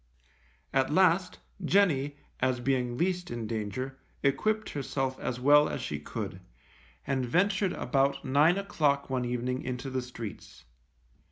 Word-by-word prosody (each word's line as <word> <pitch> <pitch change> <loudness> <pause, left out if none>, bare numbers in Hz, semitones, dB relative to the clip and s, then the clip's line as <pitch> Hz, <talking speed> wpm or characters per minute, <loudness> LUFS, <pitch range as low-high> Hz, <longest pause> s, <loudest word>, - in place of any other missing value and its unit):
At 135 +1 +2
last, 185 +1 +3 0.3
Jenny, 155 -6 +2 0.2
as 130 -1 +1
being 125 -1 0
least 180 +1 0
in 120 -1 -4
danger, 115 +5 -4 0.2
equipped 215 +11 +1
herself 135 -2 -2
as 125 - -3
well 145 +3 +6
as - - -3
she 75 - -4
could, 75 - -6 0.6
and 135 -2 0
ventured 190 - +2
about 140 0 0
nine 150 +7 +4
o'clock 145 -9 0
one 125 -1 0
evening 125 +1 -2
into 130 +1 -4
the 130 0 -1
streets. 115 -4 -9
135 Hz, 135 wpm, -29 LUFS, 125-165 Hz, 0.6 s, well